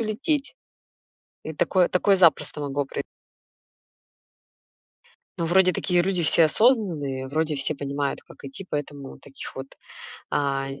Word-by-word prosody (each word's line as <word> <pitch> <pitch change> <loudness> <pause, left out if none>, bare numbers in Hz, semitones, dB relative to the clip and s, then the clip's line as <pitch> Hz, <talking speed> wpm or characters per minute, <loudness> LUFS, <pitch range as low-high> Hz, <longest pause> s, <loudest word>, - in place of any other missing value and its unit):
улететь. 275 - -2 0.9
И 160 - -5
такое 180 +3 +2
такое 195 +2 +2
запросто 170 -4 +2
могло 145 0 -2
прои 135 - -5 2.4
Ну, 165 - -1
вроде 185 +1 +4
такие 180 -2 +1
люди 180 -1 0
все 165 +1 +6
осознанные, 155 - +1
вроде 155 +2 -1
все 140 +2 0
понимают, 140 0 -3
как - - -17
идти, 160 +8 -8
поэтому 145 -2 -6
таких 135 - -11
вот, 135 0 -6 0.6
а, 135 -1 -1
нь 135 0 -9
155 Hz, 130 wpm, -24 LUFS, 140-185 Hz, 2.4 s, все